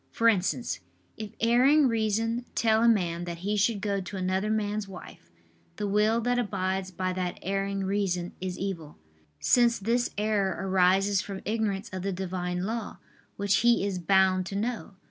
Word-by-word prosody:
For 230 - +1
instance, 180 - +1 0.4
if 215 -1 -6
erring 260 +6 +4
reason 225 +1 0
tell 220 -1 +3
a 235 - +4
man 175 -6 +1
that 170 -1 -5
he 210 +1 0
should 205 0 +1
go 200 -2 -1
to 190 +2 -7
another 190 +2 -1
man's 210 -1 -1
wife, 180 - -12 0.5
the 205 +2 -3
will 210 +3 +2
that 245 +1 +1
abides 190 -4 -2
by 185 0 -2
that 180 -1 -3
erring 195 +1 -1
reason 190 -3 -1
is 185 -1 -4
evil; 170 -6 -5 0.4
since 240 - +4
this 235 +4 0
error 205 -3 +1
arises 190 +1 +3
from 195 0 -7
ignorance 215 -1 -1
of 185 -1 -5
the 195 +2 -2
Divine 180 -1 -3
Law, 225 +2 -4 0.4
which 200 0 +1
he 235 -4 +3
is 195 -3 -2
bound 185 0 +3
to 195 - -5
know. 220 -1 -3
200 Hz, 165 wpm, -28 LUFS, 185-220 Hz, 0.5 s, erring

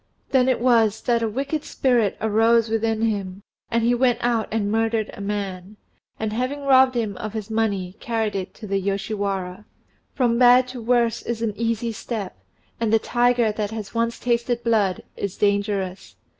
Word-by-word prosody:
Then 260 -1 +4
it 255 - +1
was 225 -3 +3
that 235 -1 +1
a 225 - 0
wicked 280 +6 -3
spirit 240 -6 +1
arose 225 +1 +3
within 225 0 0
him, 200 -3 -2 0.3
and 230 -1 +1
he 240 +1 +3
went 245 0 +2
out 235 -2 +1
and 205 -2 -1
murdered 225 -1 0
a - - -9
man, 200 -1 -4 0.4
and 220 -1 -2
having 255 +5 -2
robbed 260 -1 +5
him 220 -4 -1
of 215 0 -5
his 220 -1 -5
money 200 -4 -1
carried 225 -3 -2
it 190 -2 -4
to 225 - -10
the 195 -1 -1
Yoshiwara. 195 -1 -3 0.5
From 240 -2 +2
bad 250 0 +6
to 250 -1 -7
worse 235 -1 +1
is 235 -1 -4
an 220 -2 -1
easy 230 0 -1
step, 220 - -5 0.4
and 230 -2 0
the 225 - +6
tiger 240 0 +2
that 210 -1 -3
has 220 -2 -7
once 230 0 0
tasted 240 0 -1
blood 210 -6 +1
is 200 -2 -4
dangerous. 200 -2 -1
225 Hz, 175 wpm, -23 LUFS, 205-235 Hz, 0.5 s, bad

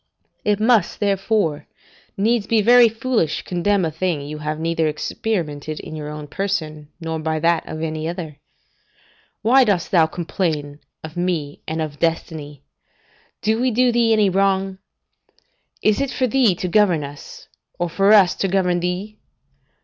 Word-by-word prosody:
It 210 -1 +1
must, 225 0 +2
therefore, 195 -6 0 0.5
needs 215 +1 +1
be 225 -2 +2
very 240 +1 +7
foolish 225 -7 -1
to - - -6
condemn 185 +1 0
a 160 - -2
thing 165 -1 -1
you 150 +2 -7
have 155 0 -3
neither 165 0 0
experimented 155 -2 -3
in 155 - -8
your 150 -1 -6
own 150 0 -7
person, 155 -4 -3
nor 160 -1 -4
by 160 0 -1
that 165 +1 +1
of 155 +1 -5
any 155 0 -3
other. 165 -4 -6 1.1
Why 260 +5 +6
dost 200 -7 0
thou 165 -4 +5
complain 160 -4 -3 0.2
of 160 +2 -9
me 170 -5 -2
and 160 0 -2
of 150 -2 -7
destiny? 155 -4 -3 0.8
Do 220 +2 +1
we 255 - +2
do 245 +1 +3
thee 235 -1 +2
any 210 -3 +3
wrong? 195 0 +1 1.0
Is 215 +5 +3
it 275 - -1
for 260 - 0
thee 250 -6 +3
to 180 - -3
govern 180 -5 +3
us, 140 0 -10 0.3
or 175 - -1
for 195 +4 +2
us 200 -4 +6
to 195 - 0
govern 180 -2 +1
thee? 185 +5 -4
175 Hz, 160 wpm, -21 LUFS, 155-210 Hz, 1.1 s, very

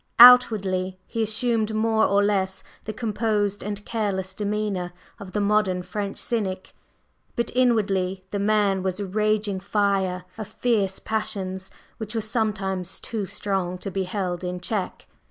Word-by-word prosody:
Outwardly 200 -7 +7
he 230 - -3
assumed 220 0 0
more 220 0 +3
or 200 0 +3
less 190 -2 0 0.2
the 215 - -3
composed 210 -2 -1
and 205 0 -4
careless 195 -4 -2
demeanor 205 -3 -2 0.3
of 190 -2 -9
the 210 - 0
modern 200 -3 +2
French 200 +1 -4
cynic, 190 -5 -2 0.6
but 235 - -1
inwardly 195 -7 +2
the 205 - -1
man 200 -2 +2
was 185 +1 -2
a 200 - -2
raging 210 0 0
fire 195 -2 0
of 215 - -4
fierce 215 -4 0
passions 195 -4 -3 0.3
which 220 0 -5
were 225 - +1
sometimes 195 -5 -2
too 215 -4 -4
strong 185 -3 -2
to 190 +2 -5
be 190 0 -1
held 180 -2 -3
in 180 0 -3
check. 190 +1 -3
205 Hz, 145 wpm, -24 LUFS, 190-215 Hz, 0.6 s, Outwardly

